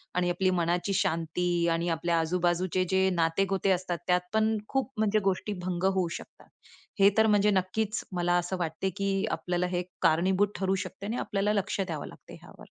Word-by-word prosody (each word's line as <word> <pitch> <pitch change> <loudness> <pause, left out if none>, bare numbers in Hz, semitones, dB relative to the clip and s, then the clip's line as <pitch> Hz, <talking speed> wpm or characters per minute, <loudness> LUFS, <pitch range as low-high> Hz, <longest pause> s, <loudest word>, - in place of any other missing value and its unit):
आणि 180 0 +1
आपली 185 +2 +1
मनाची 175 +2 0
शांती 170 0 0
आणि 170 +1 0
आपल्या 165 +1 0
आजू 165 +3 0
बाजूचे 180 +1 +1
जे 190 0 +3
नाते 165 +3 +2
गोते 195 0 +1
असतात, 180 -1 -1
त्यात 180 0 +3
पण 220 0 +2
खूप 270 -1 -1
म्हणजे 215 0 +2
गोष्टी 195 +2 -2
भंग 180 -1 -2
होऊ 185 -2 +1
शकतात. - - -15 0.5
हे 195 +1 +7
तर 220 0 +5
म्हणजे 210 -1 +4
नक्कीच 200 +3 -1
मला 175 0 +1
असं 175 +2 -2
वाटते, 170 +3 -2
की 195 +1 -1
आपल्याला 180 0 -1
हे 180 0 -2 0.2
कारणीभूत 185 +4 +3
ठरू 190 0 0
शकते 200 - -9
आणि 225 +4 -2
आपल्याला 205 -1 0
लक्ष 200 -1 -1
द्यावं 165 -6 -4
लागते - - -14
ह्यावर. - - -14
185 Hz, 185 wpm, -28 LUFS, 175-195 Hz, 0.5 s, हे